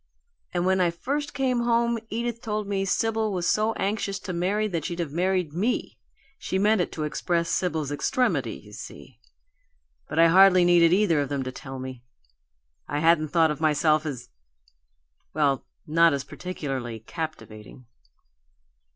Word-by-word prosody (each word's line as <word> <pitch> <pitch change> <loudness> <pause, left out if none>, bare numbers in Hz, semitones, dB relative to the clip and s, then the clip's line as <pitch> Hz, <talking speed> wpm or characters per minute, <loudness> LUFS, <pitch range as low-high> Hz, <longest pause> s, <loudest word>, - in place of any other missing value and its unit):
"And 175 0 -1
when 190 0 +2
I 175 - +3
first 285 - -3
came 260 -3 +1
home 235 0 +1
Edith 235 +1 -3
told 215 -2 -3
me 195 -1 -1
Sibyl 220 +2 0
was 180 -2 -1
so 215 +1 +2
anxious 200 -1 -2
to 185 - -5
marry 195 +5 0
that 170 -6 -3
she'd 170 -2 -4
have 170 -5 -3
married 180 -1 0
ME. 210 +9 -1 0.4
She 190 - -2
meant 205 0 +3
it - - -2
to 155 - -3
express 170 +2 -1
Sibyl's 160 -6 -1
extremity, 145 - 0
you 105 0 -14
see. - - -11 0.9
But 150 - -5
I 165 0 +6
hardly 185 0 +6
needed 170 -1 +5
either 180 -5 +3
of 140 - -3
them 140 -2 -2
to 130 - -5
tell 135 +1 -8
me. 130 -1 -7 0.9
I 145 - -3
hadn't 160 0 +3
thought 160 0 +3
of 150 - -5
myself 155 0 +2
as 130 -5 -6 1.1
well, 140 -3 +1 0.2
not 165 +1 +4
as 140 -1 -2
particularly 135 -12 -5
captivating!" 115 - -8
170 Hz, 160 wpm, -25 LUFS, 150-200 Hz, 1.1 s, I